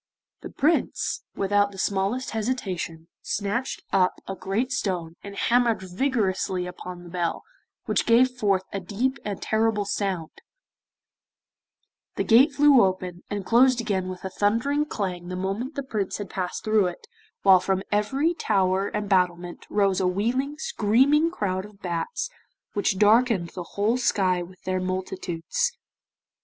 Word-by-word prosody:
The - - -7
Prince, 310 +4 0
without 205 +1 +2
the 195 - -12
smallest 200 +7 -1
hesitation, 190 -8 -3
snatched 205 +6 -2
up 185 -1 +3
a 195 - -3
great 215 +8 -2
stone, 180 -8 -2
and 200 0 -8
hammered 230 -2 +2
vigorously 190 -3 -1
upon 180 0 -8
the 175 - -11
bell, 175 -2 -2 0.4
which - - 0
gave 245 +2 +5
forth 200 -6 +1
a 200 - -1
deep 230 +9 -2
and 205 -2 -4
terrible 220 -1 +1
sound, 190 -5 -2 1.8
the - - 0
gate 255 +7 +6
flew 280 -3 +6
open, 185 -2 -2
and 205 -2 -3
closed 250 +3 +5
again 195 -5 -1
with 185 -1 -7
a 190 - -4
thundering 235 +10 +1
clang 185 -10 -4
the 180 - -4
moment 195 +10 -3
the 280 - -3
Prince 210 -7 -2
had 205 -3 -7
passed 185 -2 -3
through 215 -3 +3
it, 175 - -7 0.4
while 190 -2 +7
from 190 +1 -1
every 265 +11 +1
tower 195 - +1
and 210 0 -3
battlement 180 -2 0
rose 200 -2 +2
a 185 - +2
wheeling, 245 +10 -1
screaming 295 - +3
crowd 190 - -2
of 205 -1 -14
bats 190 - -3 0.5
which 205 -1 0
darkened 215 -3 +4
the 180 - -7 0.2
whole 215 +4 +2
sky 190 -7 +1
with 180 +1 -11
their 185 0 -1
multitudes. 185 - -2
200 Hz, 150 wpm, -25 LUFS, 185-240 Hz, 1.8 s, while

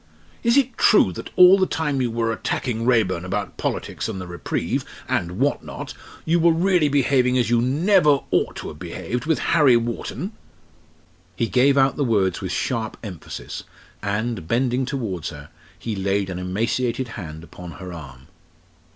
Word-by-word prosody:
Is 235 +2 +3
it 260 -3 +1
true 95 - +5
that - - -7
all 180 +2 +8
the 190 - +3
time 145 -4 -1
you 125 - +1
were 115 0 0
attacking 115 0 -2
Raeburn 100 -8 +2
about 100 +2 -3
politics - - -3
and 100 -4 -4
the 95 - -6
reprieve, 85 -1 -2 0.2
and 85 0 -1
what 140 +4 +1
not, - - -7 0.3
you 170 +2 +3
were 170 +1 +5
really 170 -2 +3
behaving 130 -2 +3
as 120 -2 +1
you 120 -1 +4
never 150 - +3
ought - - +1
to - - -6
have - - -11
behaved, 125 +5 -4
with 160 - +2
Harry 145 -7 +4
Wharton?" 120 - -4 1.0
He 115 - 0
gave 135 +3 +3
out 135 0 +3
the 145 - +1
words 100 -7 +1
with 95 -2 -4
sharp 110 +2 -2
emphasis, 95 -7 -7 0.4
and, 105 -3 -2
bending 125 +3 +1
towards 110 - -3
her, 75 -2 -11 0.3
he 115 -2 -4
laid 100 0 -1
an 90 - -4
emaciated 115 +7 -1
hand 80 -7 -8
upon 85 0 -10
her 90 -2 -8
arm. 65 -6 -10
120 Hz, 170 wpm, -22 LUFS, 95-140 Hz, 1.0 s, all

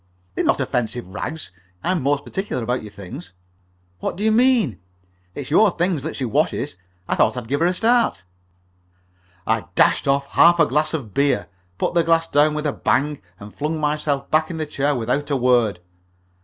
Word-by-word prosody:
"They're - - -1
not - - +2
offensive 120 -3 -2
rags. 150 +10 -6 0.3
I'm 180 -2 0
most 145 +1 0
particular 190 - -3
about 125 +3 -1
your 105 - -10
things." 90 -2 -10 0.7
"What - - -3
do 200 - -5
you 220 - +3
mean?" 230 - +3 0.6
"It's 145 -1 -6
your 210 +6 +6
things 175 -3 -1
that 160 +4 -5
she 135 - -3
washes. 110 - -1 0.3
I - - 0
thought - - +2
I'd 120 -2 -5
give 140 +4 -1
her 170 - +3
a 180 - +1
start." 230 - +2 1.2
I - - 0
dashed - - +3
off 140 0 +2
half 175 0 +5
a 165 - +6
glass 155 +3 0
of 115 -10 -6
beer, 140 -5 +1 0.3
put - - -1
the 170 -1 +3
glass 165 0 +2
down 150 -1 +2
with 150 0 -3
a 145 - 0
bang, 145 +2 0 0.2
and 105 +1 -11
flung 155 +2 -2
myself 150 -2 -1
back 155 0 +2
in 170 - -5
the 155 - -2
chair 145 -1 -1
without 125 +5 -1
a 140 - +1
word. 120 -6 +2
145 Hz, 190 wpm, -21 LUFS, 125-165 Hz, 1.2 s, your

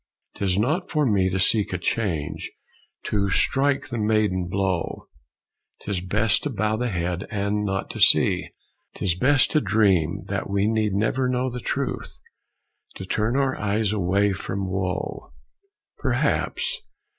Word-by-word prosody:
'Tis 95 -2 0
not 155 - 0
for 150 -2 +1
me 100 -6 +2
To 95 +1 -1
seek 100 +2 +3
a 90 - -1
change; 85 -5 -2 0.6
to 100 -1 0
strike 135 +8 +1
the 120 -2 -3
maiden 105 -4 +1
blow. 95 -2 -2 0.7
'Tis 100 -4 -3
best 105 +4 +2
to 150 - -2
bow 110 -3 0
the 120 +2 -1
head 90 -1 -2
and 105 -1 -1
not 95 -1 -2
to - - -7
see; - - +5 0.5
'Tis 90 - 0
best 130 - +3
to 155 - +3
dream, 95 - +2
that 100 0 -3
we 100 0 +1
need 110 -2 +1
never 125 +6 +1
know 125 0 0
The 125 - -5
truth. - - -3 0.8
To 95 - -7
turn 110 +5 0
our 135 -1 +1
eyes 105 0 0
away 100 +1 +1
from 95 +1 -4
woe." 95 -6 -3 0.7
Perhaps. 485 - 0
100 Hz, 145 wpm, -24 LUFS, 95-115 Hz, 0.8 s, see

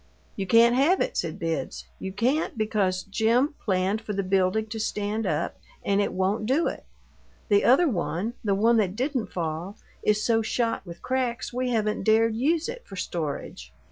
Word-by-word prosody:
"You 195 -2 -3
can't 230 +4 +6
have 290 +9 +3
it," - - -1
said 165 0 -2
Bibbs. 165 -3 -3
"You 190 - -5
can't, 245 +9 0
because 200 -4 0
Jim 235 - +1
planned 195 +1 0
for 215 -2 -5
the 195 0 -1
building 190 +3 +1
to 220 +1 -5
stand 210 +1 -2
up, - - -2 0.3
and 200 0 +2
it - - 0
won't 195 +3 0
do 285 +7 +2
it. - - -5 0.6
The 205 -1 +4
other 280 +8 +5
one 200 - -2
the 200 -3 +1
one 230 +4 +4
that 195 -3 +1
didn't 255 -1 -2
fall 170 +4 -4 0.2
is 210 0 +2
so 225 -1 +3
shot 230 +1 -1
with 170 0 -10
cracks 255 -2 -2
we 250 +1 -1
haven't 215 -3 0
dared 220 +2 +3
use 310 +7 +1
it 485 +1 -6
for 195 - -9
storage. 145 - -5
215 Hz, 180 wpm, -26 LUFS, 190-240 Hz, 0.6 s, can't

